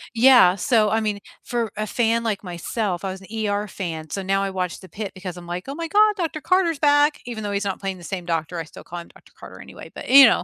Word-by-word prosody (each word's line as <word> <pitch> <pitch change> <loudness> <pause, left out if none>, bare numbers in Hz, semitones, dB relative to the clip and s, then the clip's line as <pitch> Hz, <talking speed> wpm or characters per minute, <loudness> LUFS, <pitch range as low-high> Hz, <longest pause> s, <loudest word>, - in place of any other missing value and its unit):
Yeah, 240 -7 +7
so, 215 0 +2
I 220 - +2
mean, 210 -2 -2 0.2
for 235 -4 -2
a 215 - -1
fan 230 0 +1
like 210 -3 -2
myself, 180 +2 -3
I 190 - -2
was 190 +1 -8
an 190 - -13 0.2
ER 205 +1 -1
fan, 160 -6 -5
so 195 - -2
now 195 +1 +1
I 195 - -1
watch 180 -2 -3
the 185 - -14
Pit 200 +2 -5
because 180 -2 -7
I'm, 175 -1 -10
like, 175 +2 -5
"Oh 275 - -5
my 335 0 -4
God, 420 +3 +4
Doctor 325 -3 -2
Carter's 350 -5 +2
back," 290 0 +4
even 225 -3 -6
though 205 - -3
he's 200 +1 -1
not 195 - -2
playing 195 -1 -3
the - - -13
same 185 -3 -5
doctor, 165 0 -2
I - - -3
still - - -13
call 175 0 -7
him 170 - -10
Doctor - - -20
Carter - - -11
anyway, - - -12
but, - - -8
you 275 0 +10
know, - - +3
205 Hz, 270 wpm, -23 LUFS, 180-245 Hz, 0.2 s, you